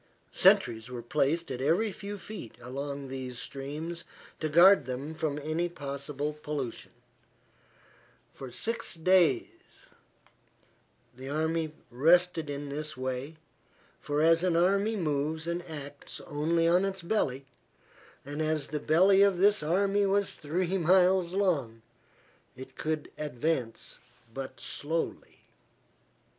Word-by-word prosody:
Sentries 110 +1 +3
were 120 -2 -6
placed 150 +6 0
at 130 0 -4
every 175 +10 +2
few 200 +2 -7
feet 200 - -9
along 140 +2 -5
these 130 -2 -6
streams 150 +6 -6 0.4
to 155 - -1
guard 170 -2 +7
them 135 +5 -4
from 155 -2 -2
any 155 +4 -1
possible 145 -1 -4
pollution. 150 -5 -5 1.4
For 135 - -8
six 230 - -2
days 165 -6 +4 1.7
the 130 +2 -8
army 160 +1 -1 0.2
rested 165 +4 +3
in 145 0 -5
this 150 +1 -4
way, 130 +4 -4 0.6
for 145 +1 -1
as 165 +1 +4
an 180 -2 +2
army 200 +5 +2
moves 155 -2 -1
and 170 +1 -2
acts 145 -2 -7
only 165 +3 0
on 175 +3 +4
its 195 -2 -3
belly, 140 -9 -1 0.8
and 145 +2 -4
as 155 -1 -1
the 150 - -2
belly 185 +7 +5
of 200 -2 +4
this 205 +3 +4
army 195 +5 +2
was 200 0 +1
three 180 +5 -1
miles 180 +1 +4
long, 140 - 0 0.7
it 130 +1 -11
could 155 -1 -3
advance 140 -4 -3 0.3
but 130 -1 -6
slowly. 160 +6 -3
155 Hz, 120 wpm, -29 LUFS, 140-175 Hz, 1.7 s, guard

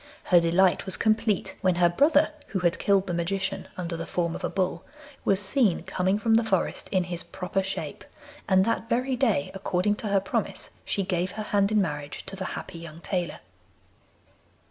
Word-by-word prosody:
Her 175 - +5
delight 175 +3 +3
was 190 - 0
complete 220 -2 +1
when 185 -2 +3
her 175 0 +5
brother 290 - +4 0.2
(who 195 - -2
had 175 -1 +1
killed 195 -1 +3
the 180 - -3
Magician 190 +3 -2
under 175 -2 -3
the 165 0 -5
form 170 -2 -1
of - - -7
a - - 0
bull) 185 -2 -1 0.4
was 195 -1 +3
seen 205 -1 +2
coming 190 +2 0
from 225 +1 +1
the 230 +1 +5
forest 195 -5 -1
in 185 -3 +2
his 175 -1 -4
proper 190 +1 -3
shape, 190 0 -5 0.5
and 190 0 +5
that 230 0 -1
very 255 +2 +1
day, 225 - +1
according 195 +1 0
to 220 - -4
her 200 -1 +3
promise, 195 - -3
she 200 - 0
gave 180 -1 -1
her 215 - -4
hand 205 -1 +1
in 210 -2 +4
marriage 150 -4 -5
to 195 - -6
the 190 -1 -5
happy 165 - -7
young 165 -1 -10
tailor. 180 -2 -3
190 Hz, 190 wpm, -26 LUFS, 175-205 Hz, 0.5 s, Her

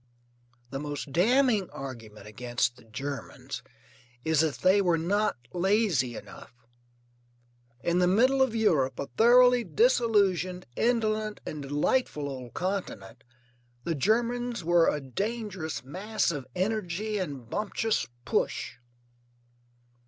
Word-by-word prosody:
The 135 - -3
most 145 -1 -5
damning 220 - +3
argument 115 -6 -9
against 120 +3 -2
the 125 -2 -18
Germans 135 +5 -6 0.6
is 160 -2 +2
that 160 -2 +2
they 190 +2 +5
were 175 -3 +2
not 200 +6 +1 0.2
lazy 180 - +1
enough. - - -11 1.3
In 170 +1 +2
the 180 - +4
middle 255 +8 +4
of 260 -4 +2
Europe, 160 -12 +2
a 140 - -4
thoroughly 245 +1 +6
disillusioned, 200 - +2
indolent 215 -3 0
and 150 - -5
delightful 145 - 0
old 130 -3 -7
continent, 180 - -4 0.6
the 170 - -1
Germans 235 - 0
were 170 0 +4
a 150 - -1
dangerous 185 - -4
mass 190 +10 -1
of 145 -5 -5
energy 210 +1 -1
and 140 -10 -5
bumptious 210 - -1 0.2
push. - - -1
180 Hz, 115 wpm, -28 LUFS, 140-220 Hz, 1.3 s, thoroughly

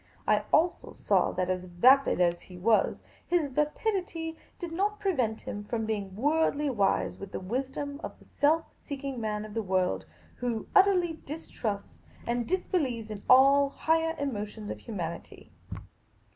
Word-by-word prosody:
I 210 0 +2
also 340 +2 +2
saw - - +2
that, 185 0 0
vapid 185 +11 +4
as 175 -1 +2
he 180 - -12
was, 215 +4 +2 0.2
his 335 -5 +1
vapidity 325 - -1 0.2
did 345 -3 -6
not 410 +5 0
prevent 260 - 0
him 205 - -6
from 225 +1 -2
being 200 -3 -3
worldly 295 +3 +1
wise 200 -5 +1
with 195 -1 -8
the - - -4
wisdom 270 - -4
of - - -6
the - - -20
self 315 +3 +2 0.2
seeking 275 -3 -5
man 210 -1 -2
of 215 - -10
the 225 - -1
world, 185 -2 0 0.3
who 240 -3 -2
utterly 360 -5 +4
distrusts 230 -9 -5 0.2
and 235 0 -1
disbelieves 270 - -1
in 205 -1 -6
all 275 +2 +7
the - - -22
higher 325 0 +1
emotions 215 -6 -4
of - - -6
humanity. 170 -7 -6
255 Hz, 150 wpm, -29 LUFS, 210-320 Hz, 0.3 s, all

